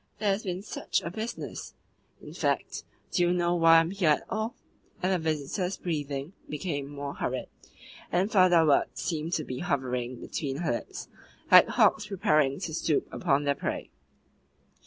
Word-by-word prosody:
"There 210 Hz, -1 st, 0 dB
has 195 Hz, +2 st, 0 dB
been 185 Hz, -2 st, -4 dB
SUCH -, -, -2 dB
a 170 Hz, -, -4 dB
business! 220 Hz, +5 st, -6 dB, 0.5 s
In -, -, -10 dB
fact, -, -, -1 dB, 0.3 s
do 180 Hz, -, +1 dB
you 175 Hz, 0 st, +3 dB
know 175 Hz, -1 st, +1 dB
why 165 Hz, -1 st, +6 dB
I -, -, +7 dB
am 165 Hz, +1 st, -2 dB
here 195 Hz, -5 st, +1 dB
at 150 Hz, -, +3 dB
all?" 220 Hz, +2 st, -2 dB, 0.5 s
And 190 Hz, +1 st, +2 dB
the 185 Hz, -, +1 dB
visitor's 160 Hz, +4 st, -2 dB
breathing 145 Hz, -1 st, -3 dB, 0.2 s
became 145 Hz, -2 st, -3 dB
more 140 Hz, -1 st, -5 dB
hurried, 130 Hz, 0 st, -3 dB, 0.6 s
and 185 Hz, +5 st, +1 dB
further 180 Hz, -4 st, +5 dB
words 145 Hz, -2 st, +2 dB
seemed 165 Hz, 0 st, -2 dB
to 155 Hz, -, 0 dB
be 130 Hz, -2 st, -5 dB
hovering 130 Hz, -6 st, -2 dB
between 135 Hz, +2 st, -4 dB
her 160 Hz, -, +1 dB
lips 120 Hz, -, -5 dB, 0.4 s
like -, -, +9 dB
hawks 210 Hz, -1 st, +3 dB
preparing 155 Hz, -8 st, +2 dB
to 170 Hz, -4 st, -4 dB
stoop 155 Hz, -2 st, 0 dB
upon 145 Hz, -4 st, +1 dB
their 145 Hz, 0 st, +2 dB
prey. -, -, -4 dB
165 Hz, 170 wpm, -28 LUFS, 145-185 Hz, 0.6 s, like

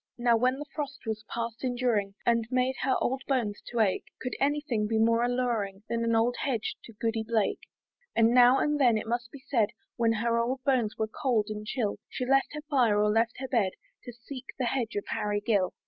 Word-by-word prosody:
Now, 240 Hz, -1 st, +3 dB
when 255 Hz, +3 st, +2 dB
the 295 Hz, -, -6 dB
frost 285 Hz, -4 st, -5 dB
was 220 Hz, -1 st, -3 dB
past 230 Hz, +1 st, -4 dB
enduring, 240 Hz, -6 st, 0 dB
And 230 Hz, -1 st, +2 dB
made 255 Hz, 0 st, +1 dB
her 260 Hz, -, +2 dB
poor -, -, +1 dB
old 265 Hz, 0 st, -3 dB
bones 235 Hz, -7 st, 0 dB
to 235 Hz, -2 st, 0 dB
ache, 195 Hz, -4 st, +1 dB
Could 250 Hz, -, -4 dB
any 290 Hz, +2 st, +2 dB
thing 230 Hz, -8 st, -1 dB
be 220 Hz, +1 st, 0 dB
more 230 Hz, +1 st, +3 dB
alluring, 235 Hz, -5 st, -1 dB
Than 230 Hz, 0 st, 0 dB
an 230 Hz, 0 st, +2 dB
old 235 Hz, +2 st, +2 dB
hedge 240 Hz, -6 st, -1 dB
to 230 Hz, -, -12 dB
Goody 225 Hz, +1 st, -1 dB
Blake? 220 Hz, -2 st, 0 dB, 0.6 s
And 225 Hz, 0 st, +5 dB
now 250 Hz, +1 st, +7 dB
and 295 Hz, +1 st, +1 dB
then, 240 Hz, -4 st, +5 dB
it 215 Hz, -, -4 dB
must 240 Hz, +1 st, -2 dB
be 280 Hz, -1 st, -12 dB
said, 225 Hz, -6 st, +2 dB, 0.3 s
When 230 Hz, -1 st, +3 dB
her 230 Hz, +1 st, +1 dB
old 255 Hz, +3 st, -1 dB
bones 250 Hz, -6 st, +1 dB
were 220 Hz, -, +1 dB
cold 220 Hz, -2 st, 0 dB
and 210 Hz, 0 st, -6 dB
chill, 215 Hz, -4 st, -1 dB
She 250 Hz, -, -3 dB
left 270 Hz, +2 st, +2 dB
her 300 Hz, -, -6 dB
fire, 245 Hz, -8 st, +3 dB
or 210 Hz, 0 st, +3 dB
left 225 Hz, +2 st, +1 dB
her 265 Hz, -, -3 dB
bed, 225 Hz, -8 st, +1 dB, 0.3 s
To 245 Hz, -, -6 dB
seek 245 Hz, +2 st, -9 dB
the 255 Hz, -, 0 dB
hedge 235 Hz, -2 st, -1 dB
of 205 Hz, -, -2 dB
Harry 205 Hz, 0 st, -1 dB
Gill. 205 Hz, -4 st, +1 dB
235 Hz, 225 wpm, -29 LUFS, 220-255 Hz, 0.6 s, now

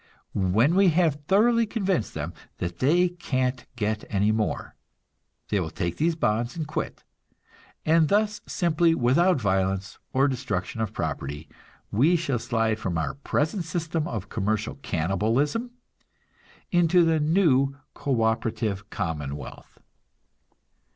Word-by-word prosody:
When 105 Hz, -, +3 dB
we 195 Hz, +1 st, +5 dB
have 160 Hz, -3 st, +2 dB
thoroughly 230 Hz, +3 st, +4 dB
convinced 195 Hz, -, -1 dB
them 80 Hz, +3 st, -4 dB, 0.2 s
that 85 Hz, -1 st, -4 dB
they 170 Hz, +7 st, +4 dB
can't 130 Hz, -7 st, -2 dB
get 105 Hz, -2 st, -1 dB
any 105 Hz, +1 st, +2 dB
more, 110 Hz, -1 st, -2 dB, 0.7 s
they 105 Hz, -, +1 dB
will 85 Hz, -4 st, -2 dB
take 85 Hz, +2 st, -3 dB
these 165 Hz, +1 st, +1 dB
bonds 120 Hz, -2 st, 0 dB
and 160 Hz, -, -2 dB
quit; 155 Hz, +1 st, -4 dB, 0.8 s
and 160 Hz, 0 st, +4 dB
thus 210 Hz, +2 st, +1 dB
simply, 170 Hz, -1 st, +2 dB
without 145 Hz, +7 st, +3 dB
violence 95 Hz, -2 st, -1 dB
or 135 Hz, +2 st, +3 dB
destruction 115 Hz, -6 st, -3 dB
of 110 Hz, -2 st, -1 dB
property, 75 Hz, -4 st, -4 dB, 0.4 s
we 145 Hz, -, +4 dB
shall 145 Hz, -8 st, 0 dB
slide 110 Hz, -1 st, 0 dB
from 90 Hz, -5 st, -2 dB
our 80 Hz, -3 st, -1 dB
present 155 Hz, +6 st, -1 dB
system 165 Hz, -1 st, -2 dB
of 105 Hz, -5 st, -4 dB
commercial 105 Hz, 0 st, -1 dB
cannibalism 115 Hz, -, 0 dB, 1.0 s
into 175 Hz, 0 st, +4 dB
the 165 Hz, -1 st, +2 dB
new 150 Hz, -4 st, +3 dB, 0.2 s
co 130 Hz, -5 st, 0 dB
operative 110 Hz, -2 st, -1 dB
commonwealth. 75 Hz, -6 st, -5 dB
125 Hz, 125 wpm, -26 LUFS, 100-165 Hz, 1.0 s, we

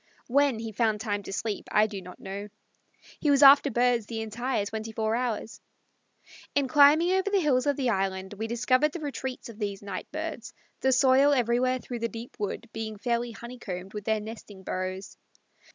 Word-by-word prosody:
When 275 Hz, -1 st, +2 dB
he 225 Hz, 0 st, -5 dB
found 220 Hz, 0 st, +1 dB
time 205 Hz, -2 st, -2 dB
to 195 Hz, -, -8 dB
sleep 205 Hz, +1 st, -3 dB
I 210 Hz, -, +5 dB
do 205 Hz, -3 st, -5 dB
not 180 Hz, 0 st, -12 dB
know. 200 Hz, +1 st, -6 dB, 0.7 s
He 300 Hz, -, +1 dB
was 285 Hz, 0 st, +5 dB
after 280 Hz, +1 st, +8 dB
birds 240 Hz, -2 st, +2 dB
the 225 Hz, -1 st, -4 dB
entire 220 Hz, 0 st, -2 dB
twenty 220 Hz, +1 st, -5 dB
four 220 Hz, 0 st, -1 dB
hours. 235 Hz, -2 st, -3 dB, 0.9 s
In 285 Hz, -2 st, +2 dB
climbing 295 Hz, +6 st, +6 dB
over 380 Hz, +1 st, +1 dB
the 405 Hz, -1 st, +3 dB
hills 280 Hz, -6 st, +2 dB
of 285 Hz, -, +2 dB
the 255 Hz, -3 st, 0 dB
island 190 Hz, -1 st, -2 dB
we 220 Hz, +2 st, -4 dB
discovered 255 Hz, +5 st, +2 dB
the 345 Hz, -, -5 dB
retreats 265 Hz, -3 st, -5 dB
of 230 Hz, -2 st, -11 dB
these 205 Hz, -1 st, -3 dB
night 195 Hz, -2 st, -5 dB
birds, 310 Hz, -6 st, -5 dB, 0.3 s
the 265 Hz, -, +2 dB
soil 265 Hz, +2 st, +5 dB
everywhere 250 Hz, 0 st, +2 dB
through 245 Hz, -1 st, -6 dB
the 230 Hz, 0 st, -1 dB
deep 230 Hz, +2 st, -9 dB
wood 210 Hz, +3 st, -3 dB
being 220 Hz, -1 st, -5 dB
fairly 235 Hz, +3 st, -1 dB
honeycombed 220 Hz, -6 st, -7 dB
with 210 Hz, -1 st, -6 dB
their 220 Hz, -1 st, +1 dB
nesting 210 Hz, -3 st, -10 dB
burrows. 185 Hz, +1 st, -4 dB
230 Hz, 185 wpm, -27 LUFS, 210-260 Hz, 0.9 s, after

